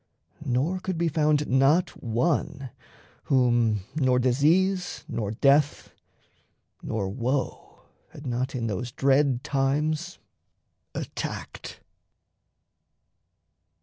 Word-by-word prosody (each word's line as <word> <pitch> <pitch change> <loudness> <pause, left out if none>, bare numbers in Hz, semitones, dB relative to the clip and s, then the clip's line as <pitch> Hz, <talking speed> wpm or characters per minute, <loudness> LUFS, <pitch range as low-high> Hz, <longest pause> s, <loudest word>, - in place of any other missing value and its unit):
Nor 145 +7 0
could 185 -1 -3
be 170 0 +1
found 150 -1 +2
not 140 +7 +3
one, 135 +2 -1 0.5
whom 120 -5 +2
nor 130 -4 +2
disease 165 +9 +2
Nor 105 -3 -3
death, 140 +6 +2 0.9
nor 105 -3 -2
woe 125 +6 -3 0.3
had 145 - -12
not 130 +2 -2
in 120 -2 -2
those 115 +3 -3
dread 135 -1 +2
times 150 +5 -1 0.8
Attacked. - - -6
135 Hz, 85 wpm, -26 LUFS, 125-155 Hz, 0.9 s, not